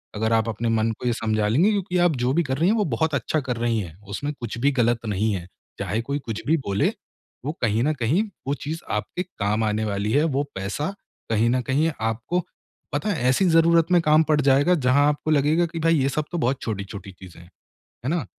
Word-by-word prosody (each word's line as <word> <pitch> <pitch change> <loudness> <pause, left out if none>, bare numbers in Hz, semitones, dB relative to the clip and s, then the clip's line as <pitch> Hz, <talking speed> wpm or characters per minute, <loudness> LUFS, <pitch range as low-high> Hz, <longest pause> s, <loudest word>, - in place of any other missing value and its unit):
अगर 110 +2 0
आप 115 0 +2
अपने 115 +2 -2
मन 115 0 +1
को - - -7
ये 120 - +2
समझा 110 -2 0
लेंगे 155 - +3
क्योंकि 185 -3 -1
आप 175 -3 +3
जो 125 - +2
भी 170 +3 +2
कर 135 -3 -2
रही 165 +5 +3
हैं 220 - +3
वो 210 - +2
बहुत 160 -1 0
अच्छा 140 +4 0
कर 125 -3 -3
रही 115 -1 0
हैं, 85 -6 -6
उसमें 145 +8 -3
कुछ 115 -2 -5
भी 140 +3 +3
गलत 120 0 +2
नहीं 105 +1 0
है। 90 -2 -5 0.3
चाहे 110 +3 -1
कोई 140 +5 -3
कुछ 115 -6 -5
भी 160 - +4
बोले 100 0 +1 0.6
वो 145 - 0
कहीं 115 0 +1
न 155 +3 +2
कहीं 150 - +2 0.2
वो 140 - +1
चीज़ 155 +3 -3
आपके 115 +12 -2
काम 105 - -2
आने 110 +1 0
वाली 100 +1 -1
है, 145 +4 +3
वो 145 -3 +1
पैसा 105 - -3 0.4
कहीं 115 +1 +3
न 125 0 +1
कहीं 155 +5 +2
आपको 115 +11 -1 0.5
पता 150 +9 -1
है 155 -11 -1
ऐसी 130 +9 +3
ज़रूरत 165 0 +4
में 175 -1 +5
काम 155 0 +4
पड़ 150 -1 +4
जाएगा 140 +6 +4
जहाँ 145 +3 +5
आपको 150 +1 -1
लगेगा 155 +4 +3
कि 165 0 -6
भाई 165 +1 +3
ये 135 +1 +2
सब 150 +3 -2
तो 175 - -2
बहुत 130 -1 0
छोटी-छोटी 100 -2 -5
चीज़ें 90 -2 -14
हैं, 85 - -17 0.6
है 135 - 0
ना? 165 -6 -1
130 Hz, 230 wpm, -24 LUFS, 110-160 Hz, 0.6 s, में